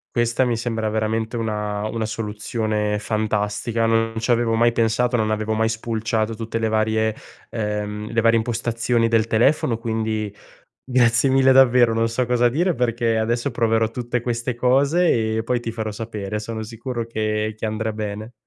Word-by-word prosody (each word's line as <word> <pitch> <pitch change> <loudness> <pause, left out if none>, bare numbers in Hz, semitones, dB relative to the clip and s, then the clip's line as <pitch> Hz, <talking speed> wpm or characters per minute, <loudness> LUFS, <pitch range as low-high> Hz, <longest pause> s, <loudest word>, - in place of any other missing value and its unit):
Questa 120 +1 +2
mi 120 -2 0
sembra 115 -2 -2
veramente 110 +2 -1
una 105 -2 -2
una 110 0 -3
soluzione 105 -1 -2
fantastica. 110 +1 -1
Non 115 0 +1
ci 115 +2 0
avevo 115 -1 +2
mai 120 +1 +4
pensato, 115 +2 +1
non 110 -1 0
avevo 110 0 -1
mai 110 +1 +1
spulciato 110 0 -2
tutte 115 +1 -4
le 115 0 0
varie 110 0 +1 0.4
ehm, 105 0 -3
le 115 - +1
varie 115 0 +4
impostazioni 115 0 0
del 115 -1 +2
telefono. 115 +1 +2
Quindi 110 -2 -2 0.5
grazie 125 0 +3
mille 135 0 +5
davvero, 125 -3 +5
non 115 0 +1
so 125 +2 0
cosa 120 0 +2
dire 170 +8 +1
perché 115 -2 0
adesso 120 +4 -1
proverò 115 -1 +1
tutte 120 0 -3
queste 120 0 -2
cose 130 -2 +2
e 110 - -1
poi 120 +1 0
ti 115 -1 -5
farò 110 -1 -4
sapere. 105 -1 -5
Sono 110 +1 -5
sicuro 115 +2 -5
che 110 -1 -2
che 110 - -5
andrà 110 0 -2
bene. 105 +1 -5
115 Hz, 165 wpm, -22 LUFS, 110-120 Hz, 0.5 s, mille